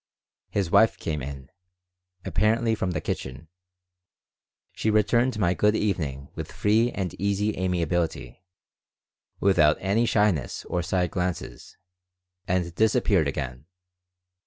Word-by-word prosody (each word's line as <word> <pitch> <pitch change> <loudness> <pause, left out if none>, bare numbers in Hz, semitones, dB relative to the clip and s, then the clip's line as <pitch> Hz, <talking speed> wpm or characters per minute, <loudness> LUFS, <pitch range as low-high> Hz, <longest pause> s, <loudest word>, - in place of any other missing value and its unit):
His 95 -4 -1
wife 110 +2 +5
came 75 -3 -3
in, 70 0 -8 0.7
apparently 110 +2 +2
from 95 -4 -1
the 90 - -2
kitchen. 65 +4 -5 1.2
She 110 - -2
returned 120 +3 +2
my 90 -4 +2
"Good 105 +3 +2
evening" 75 -11 -2
with - - -7
free 110 +3 +2
and 95 -4 -3
easy 100 +1 0
amiability, 90 -1 -2 1.0
without 80 -6 +4
any 105 +5 +1
shyness 105 - +1
or 90 - -1
side 90 0 -1
glances, 90 -2 -4 0.7
and 90 -2 0
disappeared 110 +4 +2
again. 65 +2 -5
95 Hz, 110 wpm, -25 LUFS, 80-105 Hz, 1.2 s, wife